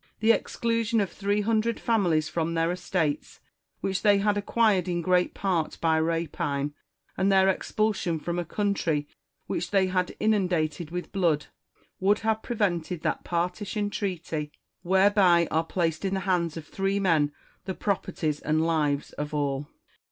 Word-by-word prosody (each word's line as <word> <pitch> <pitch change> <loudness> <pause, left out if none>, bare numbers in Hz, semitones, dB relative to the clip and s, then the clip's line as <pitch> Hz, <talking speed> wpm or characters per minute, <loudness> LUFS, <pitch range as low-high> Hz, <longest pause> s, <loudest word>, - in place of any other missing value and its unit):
The 220 +1 +5
exclusion 230 0 0
of 195 -4 0
three 205 +3 0
hundred 225 +2 +1
families 175 -9 +2
from 165 0 -2
their 165 +1 +2
estates, 175 -4 -2 0.4
which 190 -1 -1
they 205 -2 +5
had 205 +1 +2
acquired 205 -3 +2
in 175 -1 -1
great 180 0 +2
part 180 -5 -1
by 160 -1 +2
rapine, 150 -3 -1 0.4
and 195 +1 +2
their 190 0 +5
expulsion 195 -2 0
from 170 +3 -3
a - - -1
country 170 -6 -1 0.4
which 175 - -3
they 195 -2 +3
had 185 -1 -1
inundated 180 -6 +1
with 180 +1 -5
blood, 165 -7 +1 0.5
would 200 +3 +3
have 220 -1 0
prevented 180 -8 -1
that - - -1
partition 190 +4 -2
treaty, 165 -7 -3 0.3
whereby 190 -2 +4
are 160 +1 +1
placed 165 -1 -1
in 195 0 0
the 190 - -1
hands 175 -4 0
of 160 - -7
three 195 +4 -1
men 160 -6 +2 0.3
the 190 -1 -3
properties 160 -6 -1
and 155 +1 +1
lives 150 -4 0
of 150 +1 -3
all. 140 -1 -1
180 Hz, 150 wpm, -27 LUFS, 160-200 Hz, 0.5 s, The